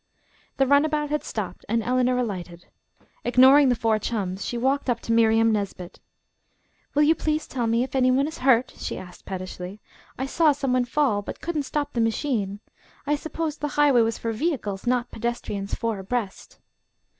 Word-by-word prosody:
The 270 - +4
runabout 295 +2 +2
had 300 - -1
stopped 190 -5 -5
and 230 +1 +1
Eleanor 250 +1 +1
alighted. 180 -7 -4 0.6
Ignoring 260 +3 +6
the 245 - +3
four 225 -2 +1
chums, 195 -4 -3
she 240 - -3
walked 265 +3 0
up 235 -1 +1
to - - -4
Miriam 225 0 +4
Nesbit. 200 -4 -4 1.0
"Will 295 - +5
you 310 +2 +5
please 310 -1 -1
tell 245 -3 -2
me 230 +2 +2
if 260 - -7
any 255 -1 +4
one 270 +3 +2
is 315 - -7
hurt?" 255 -1 +3
she - - -4
asked 180 -1 -11
pettishly. 185 +1 -6 0.4
"I 265 - -2
saw 305 +2 +3
some 275 -2 -1
one 250 -1 +2
fall, 245 -4 +1
but 205 - -8
couldn't 310 -5 -3
stop 290 -1 -2
the 235 - 0
machine. 220 -4 -1 0.4
I 295 +1 +2
supposed 315 0 -4
the 295 - 0
highway 285 -5 +5
was 225 0 0
for 230 - -3
vehicles, 225 - -2
not 245 0 0
pedestrians 220 -4 -3
four 225 -3 -2
abreast." 200 0 -4
245 Hz, 180 wpm, -25 LUFS, 215-280 Hz, 1.0 s, Ignoring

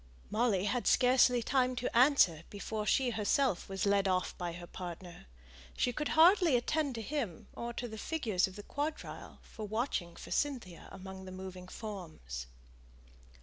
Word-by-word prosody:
Molly 215 -4 +2
had 235 +4 0
scarcely 250 -1 +5
time 255 0 +2
to 250 -1 -3
answer 240 - +5
before 210 +1 -4
she 260 -2 +3
herself 220 -1 +1
was 195 +1 -1
led 200 -1 +3
off 185 -1 0
by 175 -1 -4
her 175 0 -8
partner. 175 - -8 0.5
She 245 - +1
could 300 +4 -2
hardly 345 -2 +7
attend 280 +2 0
to 225 - -4
him 230 - -4
or 235 0 -4
to 240 +1 -4
the 220 -1 -8
figures 220 - 0
of 185 - -11
the 205 - -8
quadrille 295 +6 -5
for 215 -1 -8
watching 215 -6 -2
for - - -10
Cynthia 240 - -2
among 190 0 -9
the 185 - -8
moving 185 -1 -8
forms. 160 - -7
215 Hz, 160 wpm, -33 LUFS, 185-255 Hz, 0.5 s, hardly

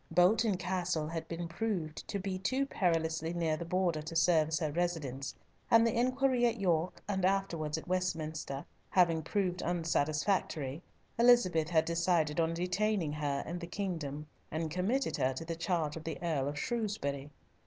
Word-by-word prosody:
Bolton 200 +3 +4
Castle 180 -3 -1
had 165 0 -4
been 170 0 -4
proved 170 -4 -3
to 200 - -2
be 190 -1 -3
too 260 +9 0
perilously 165 - 0
near 165 -2 +1
the 170 - -5
Border 175 -3 +1
to 160 +2 -7
serve 160 -2 +4
as 160 0 0
her 155 -3 -1
residence, 145 -6 -2 0.3
and 230 0 +6
the 230 - +2
inquiry 255 0 +2
at 230 -1 -1
York, 175 -2 0
and 190 -2 -1
afterwards 175 -5 0
at 160 - -8
Westminster, 160 -6 -2 0.2
having 170 -3 +3
proved 180 +2 -1
unsatisfactory, 160 -3 0 0.4
Elizabeth 185 -10 +5
had 160 -2 +3
decided 165 -2 +1
on 165 0 +1
detaining 180 -2 0
her 145 -2 -1
in 175 +3 -4
the 170 - -6
kingdom, 165 -6 -4 0.2
and 160 0 -3
committed 220 - 0
her 130 +1 +1
to 165 - -5
the 165 0 -3
charge 165 -3 -1
of 160 - -7
the 160 -1 -4
Earl 150 -5 0
of 145 +1 -3
Shrewsbury. 150 - -2
170 Hz, 165 wpm, -32 LUFS, 155-190 Hz, 0.4 s, and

